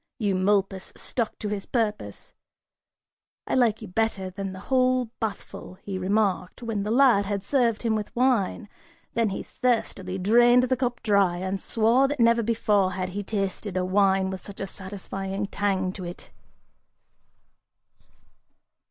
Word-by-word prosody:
Eumolpus 195 -1 0
stuck 235 -3 -3
to 215 - -4
his 205 -1 -4
purpose. 220 -4 -3 1.1
"I - - -3
like 230 -4 +2
you - - -7
better 195 -1 -1
than 195 +1 -5
the 185 0 -9
whole 255 -1 +1
bathful," 210 -3 -5
he 190 0 -6
remarked, 195 +2 0
when 225 -3 -2
the 205 - -3
lad 235 -5 +4
had 200 -1 -2
served 235 -2 +1
him 230 -2 +1
with 215 -1 -3
wine, 240 -4 +1 0.5
then 230 -2 +1
he 195 - -4
thirstily 200 -6 -1
drained 240 +6 +5
the 255 +1 +1
cup 250 -2 -2
dry 200 -5 +3
and 190 +2 -3
swore 235 +4 +3
that 290 0 -4
never 235 0 +4
before 210 -4 +1
had 185 -1 -3
he 200 +3 -4
tasted 195 -1 -3
a 185 - 0
wine 190 0 +2
with 190 -1 -6
such 200 - -11
a - - -2
satisfying 195 0 -5
tang 195 -2 -1
to 190 - -7
it. 175 0 -9
205 Hz, 150 wpm, -26 LUFS, 190-230 Hz, 1.1 s, drained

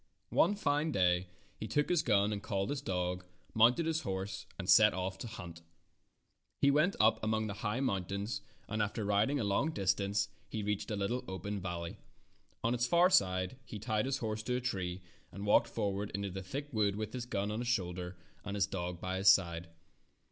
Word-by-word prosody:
One 205 - +4
fine 150 -4 +1
day 90 -4 +2 0.3
he - - -4
took 145 0 +1
his 175 -3 +3
gun 105 -4 +2
and 100 - -4
called 100 +2 -2
his 145 - -2
dog, 90 -1 -2 0.3
mounted 120 +9 +5
his 160 -1 0
horse, 95 +1 -4
and 95 - -5
set 105 0 +7
off 95 +1 -3
to - - -5
hunt. 90 -6 -8 1.0
He 140 - +5
went 155 +7 +3
up 110 0 +4
among 110 0 +1
the 105 - -3
high 110 +4 -1
moun 100 -9 0
tains, 100 +4 -3 0.3
and 110 0 -1
after 105 +1 -1
riding 105 +8 +2
a - - 0
long 100 +9 +1
distance, 100 - 0 0.2
he 110 - -3
reached 105 +2 -2
a 105 - -1
little 115 +6 -1
open 95 +2 -4
valley. 85 -2 -4 0.7
On 115 +1 +2
its 120 0 +1
far 175 +6 +5
side 95 - +2
he 110 - -8
tied 110 +1 0
his 135 0 0
horse 110 -3 -3
to 125 +3 -1
a - - +1
tree, 95 -7 -3 0.3
and 100 +1 -6
walked 105 - +5
for 105 -3 -1
ward 100 +1 -3
into 100 -1 -3
the 95 +1 -5
thick 140 +9 -6
woods 105 -2 +1
with 110 0 -4
his 125 -1 -4
gun 100 -2 -1
on 110 - -2
his 120 - -3
shoulder, 90 -5 -2 0.3
and 100 -1 -4
his 100 - +2
dog 90 -1 -4
by 95 +1 -3
his 95 +2 +6
side. 85 -3 +3
105 Hz, 205 wpm, -33 LUFS, 95-120 Hz, 1.0 s, set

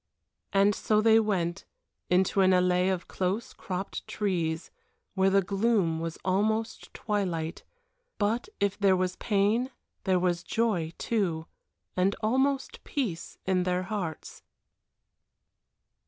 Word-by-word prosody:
And 200 +1 +4
so 215 +1 +1
they 220 +1 +6
went 180 -6 -1 0.5
into 185 +2 +3
an 185 - +5
allée 180 0 +3
of 185 -2 -3
close, 190 +5 -2
cropped 190 +1 -5
trees, 170 -5 -1 0.4
where 190 0 +3
the 195 0 +3
gloom 195 -4 +1
was 165 0 -4
almost 215 +4 0
twilight; 180 -7 -2 0.5
but 225 - 0
if 200 0 0
there 195 -2 +5
was 180 0 -1
pain 215 +5 +1 0.4
there 190 -2 +3
was 175 -1 +1
joy 195 -6 0
too, 175 -8 -1 0.5
and 190 +2 +2
almost 265 +4 0
peace 210 - -3
in 185 -1 +2
their 180 0 0
hearts. 185 -6 -5
190 Hz, 120 wpm, -28 LUFS, 180-215 Hz, 0.5 s, they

